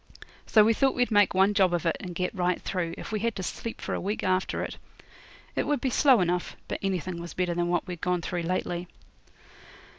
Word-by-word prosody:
So 215 - +6
we 225 +2 +4
thought 270 +4 +2
we'd 245 -1 +1
make 205 -3 +4
one 195 +2 +4
job 190 -3 +3
of 175 - -3
it, 165 - +2
and 180 -3 -7
get 180 +1 -1
right 180 -2 0
through, 175 -3 -3
if - - -7
we 215 - -1
had 230 +1 -1
to 190 - -4
sleep 230 +5 -5
for - - -4
a - - -2
week 205 +3 -2
after 185 0 0
it. - - -6 0.8
It - - 0
would 295 -1 +1
be 260 - -1
slow 260 -4 +5
enough, 180 0 -1
but - - -3
anything 185 -2 -2
was 170 - -8
better 180 -1 0
than 175 0 0
what 175 0 0
we'd 180 -3 -7
gone 180 -1 0
through 175 -2 -2
lately. 175 0 -2
185 Hz, 230 wpm, -27 LUFS, 175-210 Hz, 0.8 s, So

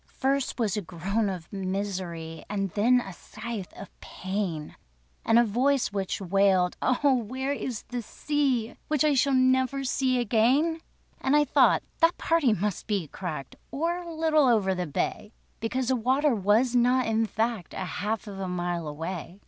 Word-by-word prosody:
First 275 -1 0
was 220 -3 +1
a 210 - -1
groan 195 +5 -2
of 180 -2 -7
misery, 185 -4 -4
And 195 -2 -2
then 240 +6 +3
a 195 -5 -8
scythe 215 +1 -7
of 200 - -10
pain; 185 -5 -4 0.5
And 225 - +4
a 235 - +7
voice 245 +2 +1
which 195 -2 -2
wailed: 190 -1 +2
"Oh 270 +2 +3
where 260 +5 -3
is 255 -5 -4
the 245 -1 -5
Sea? 265 -1 -1
Which 305 0 +2
I 300 - +4 0.2
never 260 +1 +2
shall - - -5
see 255 -1 +1
again?" 255 +8 +2 0.4
And 270 +2 +2
I 295 - +5
thought - - +4 0.2
that 335 +1 +4
party 330 -7 +2
must 210 -2 -2
be 195 -8 -1
cracked, 160 -8 -6
Or 335 +5 -1
a 345 -1 -8
little 315 -3 +3
over 210 -6 +3
the 180 -2 -3
bay; 210 - -3 0.3
Because 250 +3 -2
the 260 - +3
water 260 +4 +2
was 220 +4 +2
not, 250 +1 +3
in 225 0 +1
fact, 220 -4 -2
A 190 - -3 0.2
half 215 +2 -2
of 200 -2 -8
a 190 - -3
mile 175 -2 -2
away. 170 +4 -6
225 Hz, 170 wpm, -27 LUFS, 190-260 Hz, 0.5 s, a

